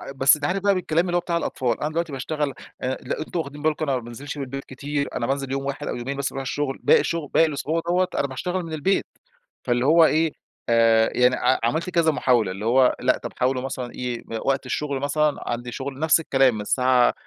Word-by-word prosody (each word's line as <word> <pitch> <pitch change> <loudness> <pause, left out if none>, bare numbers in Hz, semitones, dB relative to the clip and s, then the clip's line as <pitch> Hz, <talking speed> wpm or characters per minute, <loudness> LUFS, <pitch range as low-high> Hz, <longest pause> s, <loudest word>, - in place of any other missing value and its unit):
بس 135 +2 +5
أنت 145 -1 -4
عارف 185 +4 0
بقى 200 -1 +4
بالكلام 170 -1 +1
اللي 175 -1 -1
هو - - +4
بتاع 170 -1 -1
الأطفال، 125 -7 -1
أنا 150 - 0
دلوقتي 165 0 -2
باشتغل 145 +1 -2 0.3
آآ، 130 +1 -1
لأ 125 - -4
أنتم 155 +2 -4
واخدين 145 -1 -6
بالكم 155 0 0
أنا 135 - +2
ما - - -5
بانزلش 135 +6 -8
من 140 - -3
البيت 135 +1 -6
كتير، 140 +2 -3
أنا 115 - -1
بانزل 135 -1 -2
يوم 135 0 -2
واحد 140 +1 -4
أو - - -2
يومين 130 +3 -4
بس 140 0 -1
باروح 135 - -5
الشغل 135 +1 -3
باقي - - +6
الشغل 165 -4 -2
باقي 165 - +6
الأسبوع 155 +2 -2
دوَّة 180 +1 +2
أنا 140 - +1
باشتغل 180 +7 -3
من 165 -1 -7
البيت. 155 +6 +1 0.6
فاللي 120 +1 +1
هو 165 +2 +6
إيه، 160 0 +2 0.4
آآ، 115 -1 +4
يعني 125 +1 +4
ع 130 - +2
عملت 160 +10 0
كذا 170 -2 +3
محاولة، 120 -9 +2
اللي 100 +3 -6
هو 125 +2 +4
لأ، 125 0 +2
طب - - -7
حاولوا 130 0 +1
مثلًا 130 -2 -5
إيه 125 -2 -4
إ 115 - -2
وقت 135 0 0
الشغل 140 +1 -2
مثلًا، 145 +1 +1
عندي 120 0 -3
شغل 135 +1 -6
نفس 160 +1 +4
الكلام، 135 -6 +3
من 105 - -4
الساعة 125 +3 +3
140 Hz, 235 wpm, -23 LUFS, 125-155 Hz, 0.6 s, باقي